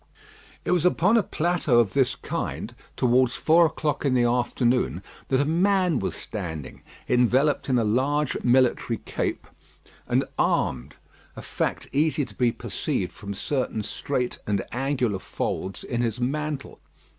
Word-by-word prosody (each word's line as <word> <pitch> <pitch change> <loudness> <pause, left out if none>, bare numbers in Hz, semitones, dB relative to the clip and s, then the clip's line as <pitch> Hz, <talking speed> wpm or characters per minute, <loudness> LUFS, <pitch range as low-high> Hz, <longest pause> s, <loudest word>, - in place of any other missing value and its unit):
It - - 0
was 180 -3 +2
upon 180 +4 +3
a 230 - +5
plateau 170 -9 +1
of 105 -5 +2
this 135 -2 +2
kind, - - -4 0.2
towards 125 0 +3
four 165 +1 +5
o'clock 150 -1 -2
in 135 -3 +2
the 120 - +4
afternoon, 120 - +1 0.2
that 130 - +2
a 140 - +2
man 180 -1 +2
was - - -3
standing, 80 - -6 0.3
enveloped 130 +5 +2
in 130 - +3
a 115 - +2
large 135 +6 +1
military 125 -2 +3
cape, - - -3 0.6
and - - +2 0.2
armed; 65 +3 0 0.4
a - - -8
fact - - -2
easy 150 0 +1
to - - -12
be 120 -2 +2
perceived 115 - -3
from 100 0 -7
certain 125 -1 -2
straight 125 +3 -3
and 100 -2 0
angular 125 -5 0
folds 95 0 -4
in 120 -1 -2
his 115 -1 -1
mantle. 145 +2 -3
125 Hz, 145 wpm, -25 LUFS, 115-150 Hz, 0.6 s, a